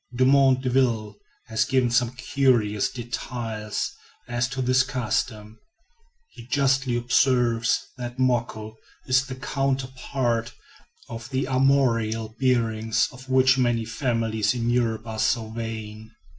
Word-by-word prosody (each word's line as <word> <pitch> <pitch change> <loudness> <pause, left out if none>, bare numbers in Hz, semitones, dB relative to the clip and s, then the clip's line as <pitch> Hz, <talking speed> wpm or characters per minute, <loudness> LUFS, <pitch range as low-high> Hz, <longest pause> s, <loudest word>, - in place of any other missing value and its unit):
Dumont 130 +1 +4
D'Urville 120 -5 +1 0.3
has 110 -1 0
given 125 +1 +1
some 120 0 +2
curious 125 -6 +1
details 115 -3 -4 0.4
as 120 0 0
to 135 -1 -5
this 130 +1 +3
custom. 110 -4 -3 0.7
He 115 - -13
justly 135 -2 +1
observes 120 -3 +2
that 120 0 -6
"moko" 115 -4 -1 0.3
is 135 +1 +2
the 130 - -6
counterpart 130 -3 -2 0.5
of 115 +1 -8
the 130 -1 -1
armorial 125 -5 +2
bearings 115 -4 +1
of 130 +1 -13
which 130 0 +4
many 120 -2 +1
families 115 -2 0
in 120 -1 0
Europe 115 -2 0
are 110 -1 -6
so 110 -1 0
vain. 110 -1 -6
120 Hz, 115 wpm, -24 LUFS, 110-130 Hz, 0.7 s, Dumont